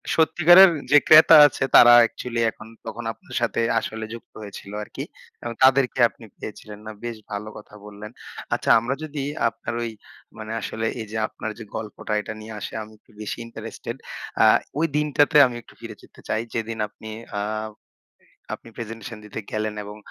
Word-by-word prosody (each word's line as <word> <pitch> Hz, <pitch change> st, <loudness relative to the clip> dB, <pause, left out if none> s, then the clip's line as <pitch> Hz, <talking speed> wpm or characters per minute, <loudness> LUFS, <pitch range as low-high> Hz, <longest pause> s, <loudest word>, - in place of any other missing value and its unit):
সত্যিকারের 175 Hz, +3 st, +7 dB, 0.2 s
যে 145 Hz, -, +8 dB
ক্রেতা 155 Hz, +1 st, +9 dB
আছে 135 Hz, -, -4 dB
তারা 120 Hz, 0 st, +9 dB
অ্যাকচুয়ালি 115 Hz, +1 st, -1 dB
এখন 110 Hz, -, -14 dB, 0.2 s
তখন 120 Hz, -, -6 dB
আপনার 180 Hz, -, -13 dB
সাথে 120 Hz, 0 st, 0 dB, 0.2 s
আসলে 110 Hz, 0 st, -6 dB
যুক্ত 115 Hz, -, -12 dB
হয়েছিল 100 Hz, -1 st, -10 dB
আরকি -, -, -7 dB, 0.4 s
এবং 120 Hz, 0 st, -4 dB
তাদেরকে 130 Hz, -1 st, +4 dB
আপনি 115 Hz, -, -16 dB
পেয়েছিলেন, 105 Hz, 0 st, -9 dB
না 110 Hz, -, -6 dB
বেশ 120 Hz, -2 st, -5 dB
ভালো 105 Hz, +1 st, -5 dB
কথা 105 Hz, 0 st, -14 dB
বললেন। 105 Hz, +1 st, -10 dB, 0.4 s
আচ্ছা -, -, -2 dB
আমরা 125 Hz, +4 st, -2 dB
যদি 150 Hz, -2 st, -5 dB, 0.3 s
আপনার 115 Hz, -, -7 dB
ওই 115 Hz, -, -4 dB, 0.5 s
মানে 110 Hz, 0 st, -7 dB
আসলে 110 Hz, +2 st, -4 dB, 0.2 s
এইযে 110 Hz, 0 st, -6 dB
আপনার 110 Hz, -, -6 dB
যে -, -, -7 dB
গল্পটা 105 Hz, 0 st, -5 dB
এটা 110 Hz, -, -7 dB
নিয়ে 110 Hz, +1 st, -9 dB
আসে -, -, -7 dB
আমি 110 Hz, +1 st, -14 dB
একটু -, -, -26 dB
বেশি 105 Hz, -, -5 dB
ইন্টারেস্টেড। 115 Hz, -, -8 dB, 0.4 s
আ -, -, +7 dB, 0.4 s
ওই 165 Hz, -, +3 dB
দিনটাতে 150 Hz, 0 st, +2 dB
আমি 125 Hz, -, -7 dB
একটু -, -, -19 dB
ফিরে 115 Hz, -2 st, -9 dB
যেতে -, -, -18 dB
চাই। 110 Hz, -, -1 dB
যেদিন 115 Hz, 0 st, -3 dB
আপনি 110 Hz, +1 st, -12 dB, 0.3 s
আ -, -, 0 dB, 1.1 s
আপনি -, -, -9 dB
প্রেজেন্টেশন 115 Hz, -1 st, -7 dB
দিতে 105 Hz, +1 st, -7 dB
গেলেন 110 Hz, 0 st, -2 dB
এবং 105 Hz, +1 st, -10 dB
115 Hz, 170 wpm, -23 LUFS, 110-125 Hz, 1.1 s, ক্রেতা